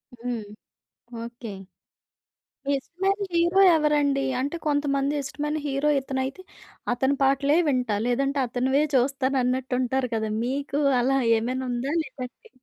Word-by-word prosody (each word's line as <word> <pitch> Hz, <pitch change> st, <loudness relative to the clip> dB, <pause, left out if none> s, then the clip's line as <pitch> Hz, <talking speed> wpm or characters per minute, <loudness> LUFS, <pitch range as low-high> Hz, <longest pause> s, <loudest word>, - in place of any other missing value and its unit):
హ్మ్. 240 Hz, -2 st, -4 dB, 0.8 s
ఓకే. 235 Hz, -2 st, -8 dB, 1.2 s
మీ 280 Hz, -, 0 dB
ఇష్టమైన 385 Hz, +7 st, -1 dB
హీరో 345 Hz, +3 st, +3 dB, 0.2 s
ఎవరండీ? 290 Hz, -3 st, +2 dB, 0.2 s
అంటే, 285 Hz, +5 st, -2 dB
కొంతమంది 285 Hz, -1 st, +1 dB
ఇష్టమైన 295 Hz, +2 st, -3 dB
హీరో 275 Hz, +1 st, 0 dB
ఇతనైతే, 265 Hz, +5 st, -3 dB, 0.5 s
అతని 265 Hz, +3 st, +1 dB
పాటలే 275 Hz, +3 st, +3 dB
వింటా, 250 Hz, -6 st, +1 dB
లేదంటే 275 Hz, +3 st, 0 dB
అతనివే 260 Hz, +4 st, +1 dB
చూస్తానన్నట్టుంటారు 260 Hz, -1 st, +1 dB
కదా! 220 Hz, -1 st, -1 dB
మీకు 280 Hz, +3 st, -2 dB, 0.2 s
అలా 270 Hz, +2 st, +2 dB, 0.2 s
ఏమైనుందా? 255 Hz, +3 st, -2 dB
లేదంటే 255 Hz, -3 st, -9 dB
270 Hz, 105 wpm, -25 LUFS, 250-285 Hz, 1.2 s, హీరో